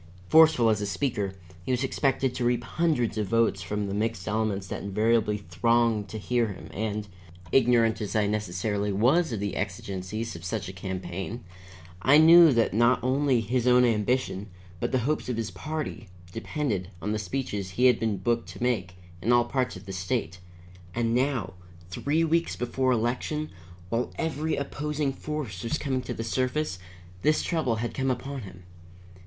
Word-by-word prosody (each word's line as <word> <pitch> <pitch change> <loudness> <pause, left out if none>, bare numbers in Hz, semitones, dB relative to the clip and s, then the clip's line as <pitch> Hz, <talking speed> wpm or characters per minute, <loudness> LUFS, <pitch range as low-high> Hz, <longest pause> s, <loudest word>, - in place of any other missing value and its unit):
Forceful 155 -8 +6
as 105 -1 0
a 105 - -2
speaker, 100 -4 -2 0.3
he - - -8
was 125 +1 +1
expected 135 -1 0
to 125 - -3
reap 120 0 +1
hundreds 125 -6 0
of 105 - -1
votes 115 -2 +2
from 105 +1 -2
the 100 - -4
mixed 105 -2 -2
elements 105 -2 -1
that - - -5
invariably 105 +1 +1
thronged 110 +3 +1
to 110 - -5
hear 120 +2 0
him, 95 -3 -8
and, 105 0 -3 0.4
ignorant 115 -3 +3
as 105 -2 -4
I 105 -1 +3
necessarily 105 0 -1
was 130 - +3
of 110 - -2
the 100 0 -3
exigencies 100 +2 -4
of 85 - -9
such 95 +1 -3
a 95 - -7
campaign, 95 +4 -5 0.6
I 135 +8 +6
knew 165 +1 +9
that 115 -5 +2
not 120 +3 +4
only 130 -1 +2
his 120 +3 0
own 125 0 +6
ambition, 110 -2 0 0.3
but - - -1
the 130 - +2
hopes 150 -2 -1
of 125 - -1
his 115 -2 -3
party, 150 -8 -5 0.2
depended 110 - -2
on 105 +4 -3
the 110 - -1
speeches 105 -2 -3
he 125 +8 +1
had 125 -3 +5
been 110 -3 0
booked 115 +4 -1
to - - -6
make 95 -8 -1 0.3
in 115 - +1
all 120 -1 +5
parts 125 0 -1
of 95 - -11
the 95 - -6
state. 90 -1 -2 0.6
And 115 -1 +1
now, 125 -4 0 0.4
three 150 - 0
weeks 165 +1 +1
before 130 +1 0
election, 125 +6 -1 0.4
while 115 +4 -1
every 160 -1 -1
opposing 145 0 -2
force 135 -12 -5
was 115 +7 -1
coming 130 -4 -1
to 125 - -5
the 115 - -4
surface, 130 -2 -1 0.4
this 155 +1 +2
trouble 155 -9 0
had 115 +2 -3
come 135 0 -1
upon 135 +2 -3
him. 95 -3 -11
115 Hz, 175 wpm, -27 LUFS, 105-130 Hz, 0.6 s, knew